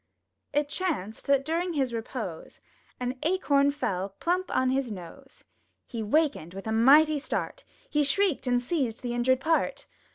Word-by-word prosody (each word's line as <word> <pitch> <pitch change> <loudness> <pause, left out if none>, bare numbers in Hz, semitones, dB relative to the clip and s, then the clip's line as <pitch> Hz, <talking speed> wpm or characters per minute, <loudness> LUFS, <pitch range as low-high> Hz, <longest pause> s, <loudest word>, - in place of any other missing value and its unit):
It 290 0 +1
chanced 290 - -3
that 275 -1 +3
during 340 +3 -1
his 265 -5 0
repose. 225 -6 -6 0.4
An 250 +1 -3
Acorn 290 -5 +2
fell 200 -9 -2
plump 360 +2 0
on 260 0 +1
his 265 -3 -1
nose! 205 +9 -10 0.4
He 230 -3 -5
wakened 220 - 0
with 195 - -7
a 220 - -2
mighty 290 +7 +6
start; - - -4 0.2
He 295 0 +1
shrieked 315 0 +1
and 245 0 +3
seized 250 -3 -2
the 240 -1 -2
injured 250 +2 +2
part! 325 +3 0
270 Hz, 155 wpm, -28 LUFS, 230-310 Hz, 0.4 s, mighty